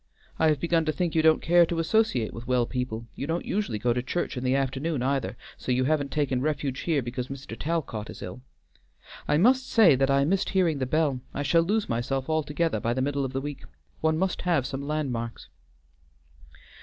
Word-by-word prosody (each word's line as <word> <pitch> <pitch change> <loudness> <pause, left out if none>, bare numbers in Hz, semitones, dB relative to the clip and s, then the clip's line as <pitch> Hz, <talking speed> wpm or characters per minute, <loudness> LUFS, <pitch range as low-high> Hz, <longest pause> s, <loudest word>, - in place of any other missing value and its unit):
"I 160 - +4
have 150 -2 +2
begun 165 +1 +2
to 155 - +1
think 175 0 -1
you 160 - +3
don't 160 0 +4
care 175 +1 +6
to 170 - -2
associate 165 - +1
with 115 +2 -8
well 125 -2 +2
people; 115 -2 -4
you 140 - -5
don't 165 +2 -2
usually 200 - -1
go 120 +3 +1
to 125 - -1
church 155 +7 -2
in 125 - -4
the 130 +1 +2
afternoon 135 +1 -1
either, 130 -5 -1 0.2
so - - -4
you 125 +1 +2
haven't 140 0 +1
taken 135 -4 0
refuge 140 -2 -1
here 155 -6 0
because 125 +1 -4
Mr. 135 -4 -7
Talcot 145 -8 -3
is - - -8
ill. 90 +7 -7 0.9
I 150 - +3
must 255 +8 +3
say 215 -10 +6
that 135 +1 +2
I 140 0 +3
missed 190 +5 +1
hearing 175 -6 +2
the 130 - -1
bell; 145 -3 +1
I 145 - -1
shall 165 +3 +4
lose 205 +5 0
myself 130 +5 -2
altogether 155 -3 0
by 115 +2 -1
the 130 - 0
middle 140 0 -1
of 135 0 -4
the 135 - -1
week. 145 0 -6 0.4
One 160 0 +1
must 185 +1 -1
have 170 -7 +1
some 135 +1 -4
landmarks." 135 -6 -3
140 Hz, 210 wpm, -27 LUFS, 125-165 Hz, 0.9 s, care